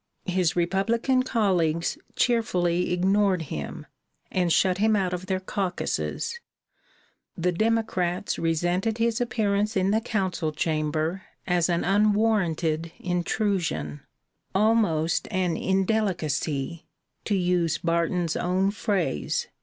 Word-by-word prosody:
His 180 -3 +1
Republican 225 +9 +1
colleagues 180 -10 +1 0.2
cheerfully 180 -8 +1
ignored 190 0 +2
him, 75 -2 -5 0.5
and 180 -2 +1
shut 185 +2 +3
him 215 +1 +3
out 185 -3 0
of 180 +1 -4
their 190 -1 0
caucuses; 195 - -2 1.0
the 180 +1 +1
Democrats 200 -3 0
resented 175 +6 0
his 230 0 +1
appearance 210 -3 0
in 190 +1 +2
the 220 +1 +2
Council 190 -8 -1
chamber 155 +3 -1 0.2
as 175 -1 +2
an 170 -1 +1
unwarranted 195 -6 +1
intrusion 175 - -1 0.5
'almost 195 -7 +2
an 185 -4 0
indelicacy,' 170 -7 -1 0.4
to 205 - +1
use 175 -3 +1
Barton's 170 0 0
own 185 +2 +1
phrase. 195 - -1
185 Hz, 105 wpm, -26 LUFS, 170-210 Hz, 1.0 s, shut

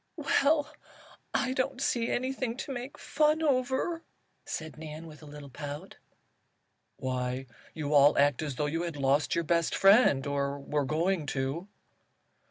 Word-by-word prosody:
"Well, 295 +1 +2 0.6
I 255 -1 0
don't 260 0 -1
see 235 -3 0
anything 255 -1 -2
to 270 - -5
make 250 +2 -6
fun 305 +1 +1
over," 270 +4 0 0.5
said 160 -1 -5
Nan, 155 +1 -8
with 155 -1 -12
a 155 - -12
little 145 -1 -10
pout. 145 +7 -7 1.0
"Why, 130 0 -2 0.3
you 150 -1 -2
all 145 0 +6
act 145 -1 +3
as 145 -4 -3
though 150 - -1
you 160 +3 -1
had 170 -3 -4
lost 140 +2 +2
your 170 - +1
best 170 0 +1
friend 195 - +5
or 140 0 -1
were 145 +1 -1
going 160 +2 0
to." 135 +8 -2
160 Hz, 150 wpm, -29 LUFS, -, 1.0 s, all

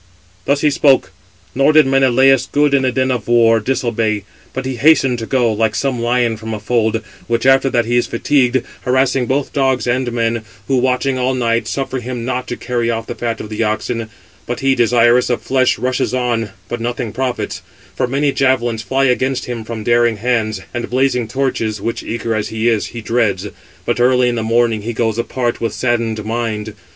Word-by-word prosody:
Thus 140 +1 +1
he 150 - +3
spoke; 135 -9 +3 0.4
nor 135 +3 +3
did 155 0 +6
Menelaus, 135 0 +4
good 145 0 +2
in 140 - +4
the 130 -1 +1
din 130 +1 0
of 120 -5 -3
war, 115 -1 +4
disobey. 110 -3 -1 0.3
But 130 0 -5
he 130 -1 -3
hastened 135 -3 +4
to 115 - -5
go, 120 -4 +2
like 110 0 0
some 130 -4 -1
lion 120 -1 +1
from 110 0 -5
a - - -6
fold, 110 0 0 0.2
which 115 0 -1
after 135 0 +4
that 120 -3 +1
he 120 +1 +1
is 120 - +1
fatigued, 130 0 +1 0.2
harassing 130 0 +1
both 135 +2 -1
dogs 135 -3 +1
and 125 0 0
men, 115 -1 -1 0.2
who 135 - +2
watching 130 +1 +1
all 130 +1 0
night, 115 -2 0
suffer 135 -1 -3
him 120 -1 -5
not 125 0 -3
to 120 - -4
carry 120 -2 -2
off 115 -1 -2
the - - -5
fat 115 -1 -3
of 105 - -8
the 110 +1 -3
oxen; 110 +1 -2 0.4
but 120 - -4
he, 135 0 +3
desirous 120 0 +3
of 120 - -1
flesh, 130 -1 +2
rushes 125 0 -1
on, 120 -3 -1 0.2
but 120 - -4
nothing 120 -1 -3
profits; 125 0 -3 0.3
for - - 0
many 140 +3 +1
javelins 120 -5 +1
fly 135 +4 0
against 130 0 +1
him 120 -2 -5
from 110 -1 -6
daring 120 -1 +2
hands, 110 -1 -1
and 120 - -4
blazing 125 -2 +1
torches, 115 -4 -2
which, 115 +4 -3
eager 115 0 -3
as 110 -1 -1
he 110 +1 -2
is, 115 -3 +1
he 115 - -8
dreads; 105 -4 0 0.4
but 120 0 -1
early 125 0 +3
in - - -1
the 115 - -2
morning 115 -1 +1
he 115 +3 -4
goes 110 0 -1
apart 120 0 -2
with 115 - -1
saddened 115 -3 -1
mind. 110 -2 -3
120 Hz, 200 wpm, -17 LUFS, 115-130 Hz, 0.4 s, did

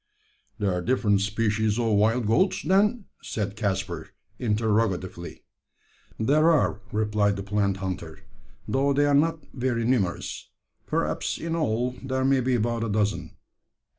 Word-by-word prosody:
"There 100 -3 0
are 90 - -1
different 105 -2 +2
species 105 +1 0
of 115 -2 +1
wild 110 +4 +2
goats, 150 - +2
then?" 205 +3 +2 0.2
said 100 -2 -3
Caspar, 95 -4 -2 0.3
interrogatively. 105 -6 -1 0.8
"There 150 +8 +4
are," 145 -10 +2
replied 105 -1 +1
the 100 - -5
plant 100 -1 0
hunter, 90 -4 -5 0.5
"though 140 +1 +2
they 145 +1 +3
are 145 - +2
not 160 +3 +2
very 120 -3 -1
numerous 105 -9 -1 0.4
perhaps - - -1
in 165 0 -3
all 125 -6 0
there 130 0 -1
may 135 0 +4
be 125 0 +1
about 115 0 0
a 115 - -2
dozen. 105 0 -1
110 Hz, 135 wpm, -26 LUFS, 100-130 Hz, 0.8 s, There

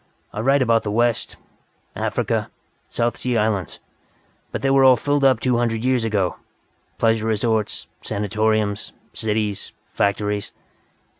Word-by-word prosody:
I - - -5
write 135 +4 +3
about 115 -2 +3
the 105 - -4
West, 115 +2 0 0.6
Africa, - - -1 0.4
South 120 0 -1
Sea 125 -2 -1
Islands. 105 -5 -1 0.7
But - - -4
they 135 - +3
were 135 0 +5
all 130 -1 +8
filled 145 +3 0
up 130 -4 +5
two 125 0 +1
hundred 115 -1 0
years 130 -2 +2
ago. 105 -5 0 0.6
Pleasure 115 -1 +2
resorts, 110 -4 0 0.2
sanatoriums, 110 0 -1 0.2
cities, 105 -2 -2 0.2
factories." 105 0 -1
110 Hz, 130 wpm, -22 LUFS, 105-120 Hz, 0.7 s, all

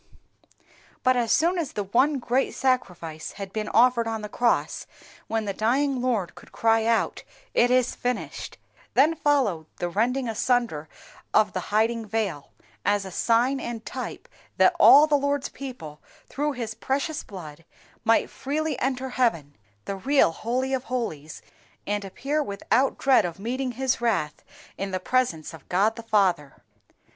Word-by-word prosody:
But 255 0 +4
as 235 -2 0
soon 345 +3 +3
as 310 -5 -3
the 205 - -2
One 265 +9 +2
great 255 +1 0
Sacrifice 175 -12 -2
had 195 -2 -8
been 215 -1 -3
offered 235 -1 +4
on 225 -1 -3
the 210 - -5
cross, 240 +2 0 0.4
when 225 -1 -1
the 200 - -2
dying 255 +5 +1
Lord 230 -8 -1
could - - -16
cry 225 0 +2
out 230 0 +1 0.3
'IT 245 - +4
IS 255 -1 +2
FINISHED,' 250 0 -4 0.4
then 295 +5 +5
followed 270 - +1
the 175 - -2
rending 245 +7 0
asunder 225 -9 0 0.5
of 215 -1 +4
the - - -1
hiding 225 +1 +1
veil, 200 -9 -2 0.3
as 205 -1 +1
a 190 - -7
sign 240 +7 +2
and 235 -3 -6
type - - -6 0.3
that - - +5
all 290 +2 +9
the 305 - -2
Lord's 285 0 -1
people, 200 - -9 0.3
through 295 +2 -2
His 235 -4 -4
precious 280 +6 -2
blood, 165 -5 -10 0.4
might 225 0 +3
freely 295 0 -3
enter 265 0 -1
heaven, 170 - 0 0.3
the 200 - -4
real 270 - +3
Holy 255 +8 -2
of 260 -1 -1
holies, 160 - -4 0.4
and 205 0 -1
appear 275 +10 -2
without 240 +3 0
dread 270 -1 +4
of 170 -2 -4
meeting 250 +5 -3
His 260 0 -1
wrath 205 -11 -1 0.4
in 195 - -2
the 185 -1 -2
presence 185 -8 0
of 160 -4 -14
God 205 +5 +2
the - - -7
Father." 190 - 0
230 Hz, 155 wpm, -25 LUFS, 200-260 Hz, 0.5 s, all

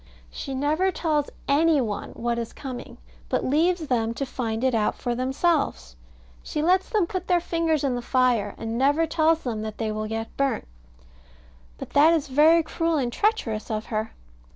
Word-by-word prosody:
She 270 -2 -5
never 305 +7 +1
tells 305 -5 0 0.2
any 305 +2 +4
one 215 -5 -3
what 235 0 -2
is 230 - -5
coming, 260 -4 -8 0.3
but - - 0
leaves 325 +4 +2
them 230 -4 0
to 275 - -2
find 230 -3 -3
it 260 -1 +2
out 215 -2 +1
for 245 - -2
themselves. 255 - 0 0.5
She 300 - -3
lets 370 +3 +3
them 420 -5 +2
put 370 +1 -5
their 355 -1 +3
fingers 330 -3 0
in 270 -3 +1
the 245 - -2
fire, 240 -5 +1
and 225 +1 -3
never 290 +5 +3
tells 320 0 +2
them 225 -4 -3
that 215 -1 -6
they 220 -2 -2
will 215 0 -3
get 225 +1 -5
burnt. 275 - 0 1.1
But - - -8
that 305 +4 +6
is 305 -3 -2
very 315 +5 +5
cruel 330 +1 -1
and 245 -4 -1
treacherous 255 - 0
of 215 -1 -2
her. 215 +1 -2
275 Hz, 180 wpm, -25 LUFS, 230-325 Hz, 1.1 s, that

